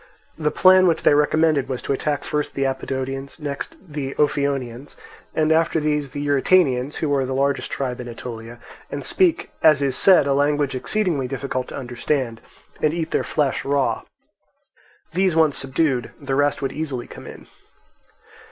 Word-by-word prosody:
The 150 -1 0
plan 185 +3 +6
which 165 -2 +1
they - - +5
recommended 150 0 +2
was 130 -2 -2
to - - 0
attack 145 +1 -2
first 150 -1 -2
the 135 - 0
Apodotians, 135 +1 -3
next 145 -2 -5
the 145 -6 -6
Ophionians, 140 -3 -1 0.4
and 155 0 +2
after 160 0 +3
these 150 -2 -1
the 145 +2 -5
Eurytanians, 140 -2 +2
who 150 -3 -1
are 135 -1 +2
the 130 0 -3
largest 140 +1 0
tribe 125 -2 -3
in 125 - -8
Aetolia, 115 0 -8 0.3
and - - -5
speak, 365 -4 +1
as 155 -2 +6
is 135 -2 0
said, 185 -7 +6
a 140 - +2
language 145 0 +1
exceedingly 155 -1 -1
difficult 130 -1 -3
to - - -7
understand, 125 -2 -2 0.4
and 155 +1 +2
eat 165 -1 -3
their - - +1
flesh 145 -3 0
raw. 140 -1 0 1.1
These 185 -1 +2
once 160 -3 +3
subdued, 135 -2 0
the 140 -2 -4
rest 145 +1 +1
would 135 - -1
easily 145 -6 -4
come - - -11
in. - - -11
140 Hz, 165 wpm, -22 LUFS, 135-155 Hz, 1.1 s, plan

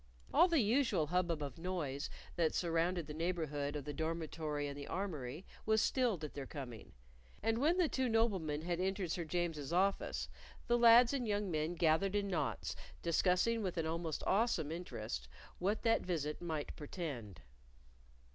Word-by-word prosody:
All - - +7
the 330 -6 +3
usual 220 - +2
hubbub 170 -1 0
of 140 +1 -6
noise 160 -6 -2 0.3
that 165 -3 +1
surrounded 170 0 +1
the 150 - -7
neighborhood 155 -3 -2
of 145 -2 -4
the 150 - -4
dormitory 160 -2 -2
and 140 - -5
the 140 0 -7
armory 160 -5 -4 0.2
was 220 0 +3
stilled 225 - +1
at 150 - -5
their 140 -2 -5
coming, 125 -7 -8 0.5
and 225 +1 +2
when 320 +7 +3
the 360 -3 +4
two 260 -3 0
noblemen 190 -10 +1
had 175 0 -1
entered 190 -2 -1
Sir 170 -1 -2
James's 160 -3 -2
office, 195 +3 +1 0.4
the 240 - +3
lads 235 +2 +8
and 255 -4 -1
young 205 -2 0
men 155 +2 -1
gathered 170 +4 +2
in 200 -1 0
knots 175 -4 -1 0.3
discussing 180 +7 +2
with 185 -4 -2
an 165 - 0
almost 165 -1 -2
awesome 195 -8 +2
interest 110 - -5 0.3
what 200 +4 0
that 225 -1 +4
visit 150 -4 -2
might 160 -4 -3
portend. 135 - -6
170 Hz, 165 wpm, -36 LUFS, 150-200 Hz, 0.5 s, lads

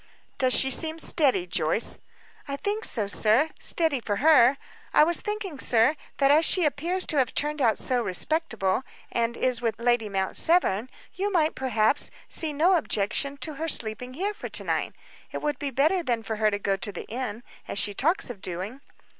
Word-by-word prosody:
"Does 255 -2 +3
she 265 - +3
seem 320 +4 -1
steady, 280 - +2
Joyce?" 175 +3 +1 0.5
"I 280 - -3
think 410 +9 -1
so, 215 -4 +4
sir 220 +9 +2
steady 320 -5 +2
for 210 -3 -3
her. 275 0 +5 0.4
I - - +7
was 340 +2 +2
thinking, 415 -8 -5
sir, 240 +5 +3 0.2
that 275 0 +3
as 310 +3 +5
she 355 +1 +4
appears 335 +6 -1
to 305 - -1
have 260 -1 0
turned 300 0 -1
out 225 -4 +2
so 250 -2 0
respectable, 225 - 0 0.3
and 235 0 -1
is 250 -2 0
with 230 -2 -1
Lady 235 -2 +1
Mount 190 -1 -2
Severn, 255 - +2 0.2
you, 400 +2 -2 0.2
perhaps, 245 0 +1
might - - -13
see 320 -2 0
no 340 +6 +3
objection 275 +2 -1
to 310 +4 -3
her 325 - -1
sleeping 250 -2 -1
here 395 +6 -2
for - - -8
to - - -1
night. - - -2 0.4
It - - -6
would 295 -1 -2
be 285 - -2
better 310 +8 +1
than 240 -7 -2
for 220 -1 -4
her 215 0 +2
to 205 - -2
go 200 -1 -1
to 205 - -3
the - - -8
inn, 235 -1 -5 0.2
as - - -5
she 205 0 +1
talks 300 - 0
of 205 -6 -12
doing." 190 +10 -5
260 Hz, 195 wpm, -25 LUFS, 220-315 Hz, 0.5 s, I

